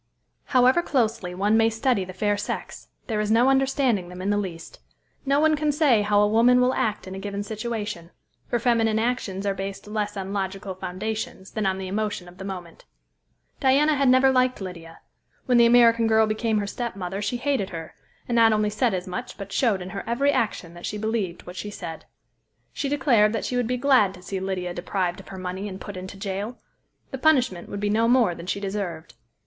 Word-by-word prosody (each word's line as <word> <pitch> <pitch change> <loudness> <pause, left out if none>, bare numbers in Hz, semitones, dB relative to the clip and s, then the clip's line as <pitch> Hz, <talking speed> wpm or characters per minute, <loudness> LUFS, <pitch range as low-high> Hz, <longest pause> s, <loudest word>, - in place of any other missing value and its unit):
However 255 +4 +4
closely 225 - -1
one 205 +4 +2
may 225 0 +4
study 225 -2 +1
the 185 - -8
fair 205 +2 0
sex, 205 - -5 0.2
there 220 -3 -2
is 210 0 -1
no 235 +4 +4
understanding 265 -8 +1
them 180 0 -9
in 195 +2 -1
the - - +2
least. 175 -5 -6 0.5
No 280 +1 +3
one 310 0 +4
can 300 0 +1
say 285 -7 +3
how 205 0 +3
a - - +4
woman 235 +4 +5
will 250 +1 +3
act 215 -3 -1
in 185 - -7
a 190 - -6
given 200 0 -4
situation; 210 -5 -4 0.4
for 240 - 0
feminine 230 -2 +2
actions 220 -4 -1
are 200 - +1
based 195 0 -6
less 210 -1 -3
on 195 0 -4
logical 195 0 -3
foundations 190 +1 -5
than 215 -3 -1
on 190 0 0
the 190 -1 -5
emotion 205 -2 -3
of 180 +1 -15
the - - -6
moment. 180 -4 -8 0.7
Diana 285 +4 +4
had 275 -2 +3
never 260 +1 +5
liked 255 0 +2
Lydia; 170 -4 -9 0.4
when 250 -2 +4
the 235 - +7
American 235 -1 +5
girl 220 0 +4
became 220 +1 0
her 205 - 0
stepmother 200 -4 -4
she 210 +4 -1
hated 250 -6 -1
her, 165 -2 -7 0.3
and 240 - -1
not 225 -1 +6
only 210 -1 +1
said 220 -1 +1
as 180 0 -4
much 180 -2 -6
but 200 -1 -8
showed 210 -8 +1
in 185 - -8
her 195 - -5
every 275 +5 +2
action 205 -9 -1
that 175 0 -7
she 210 - -4
believed 210 -5 -2
what 180 - -9
she 205 +3 -5
said. 170 -5 -7 0.7
She 280 - -2
declared 245 -7 +3
that 225 - -2
she 250 - -2
would 245 -2 +1
be 250 +1 -1
glad 250 -8 +3
to 180 - -14
see 190 +1 -4
Lydia 185 -2 -3
deprived 180 0 -2
of - - -13
her 195 - -8
money 185 +2 -4
and 190 0 -8
put 205 - -8
into 185 +2 -8
jail! 200 +4 -4 0.5
The 265 - -5
punishment 250 - +2
would 200 - -5
be 205 0 0
no 225 +2 +3
more 240 -6 +4
than 170 +1 -10
she 200 - -1
deserved. 190 -8 -4
210 Hz, 215 wpm, -25 LUFS, 190-240 Hz, 0.7 s, the